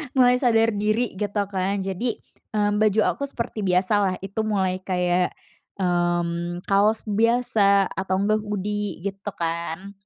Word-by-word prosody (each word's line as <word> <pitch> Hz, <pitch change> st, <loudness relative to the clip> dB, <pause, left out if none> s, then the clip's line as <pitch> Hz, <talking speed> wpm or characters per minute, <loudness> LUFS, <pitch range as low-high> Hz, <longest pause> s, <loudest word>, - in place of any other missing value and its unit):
Mulai 250 Hz, -1 st, +5 dB
sadar 230 Hz, -3 st, +3 dB
diri 215 Hz, +3 st, 0 dB
gitu 205 Hz, 0 st, -1 dB
kan 195 Hz, +1 st, -1 dB
jadi, 195 Hz, +6 st, -2 dB, 0.4 s
eee, 205 Hz, -1 st, +2 dB
baju 215 Hz, 0 st, +3 dB
aku 280 Hz, -, -6 dB
seperti 235 Hz, -4 st, -5 dB
biasa 185 Hz, +3 st, +2 dB
lah 190 Hz, -2 st, +1 dB
itu 195 Hz, +3 st, -5 dB
mulai 190 Hz, -3 st, 0 dB
kayak, 180 Hz, -1 st, 0 dB, 0.4 s
mmm, 175 Hz, -1 st, -1 dB
kaos 205 Hz, +3 st, +2 dB
biasa, 215 Hz, -3 st, +2 dB
atau 190 Hz, 0 st, -2 dB
enggak 215 Hz, +1 st, +2 dB
hoodie 205 Hz, -3 st, -3 dB
gitu 200 Hz, +1 st, -5 dB
kan. 170 Hz, +3 st, -3 dB
200 Hz, 135 wpm, -24 LUFS, 185-215 Hz, 0.4 s, Mulai